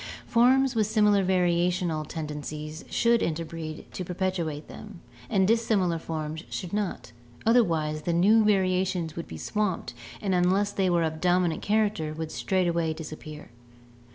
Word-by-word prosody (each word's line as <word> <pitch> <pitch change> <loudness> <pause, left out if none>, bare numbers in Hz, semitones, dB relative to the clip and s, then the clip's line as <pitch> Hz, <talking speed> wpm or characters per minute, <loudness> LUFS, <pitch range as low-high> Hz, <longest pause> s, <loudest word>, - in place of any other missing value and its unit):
Forms 260 +3 +4
with 220 -3 +1
similar 210 -2 +3
variational 175 -3 +1
tendencies 150 0 -6
should 235 -1 +3
interbreed 160 -1 -4
to 185 - -4
perpetuate 175 -4 -3
them, 210 -4 -10 0.3
and 190 -1 +3
dissimilar 210 -7 +2
forms 160 0 -5
should 180 0 -5
not, 205 - -3 0.3
otherwise 165 -10 +2
the 170 +3 -1
new 210 +6 +5
variations 185 -4 +1
would 170 - -5
be 80 - -8
swamped 205 - -2 0.3
and 195 -2 -1
unless 185 +3 +2
they 195 -2 +1
were 170 -1 +2
of 160 0 -3
dominant 175 -2 +2
character 205 -7 0
would 160 0 -5
straightway 170 -4 0
disappear. 155 -1 -9
180 Hz, 135 wpm, -27 LUFS, 160-205 Hz, 0.3 s, new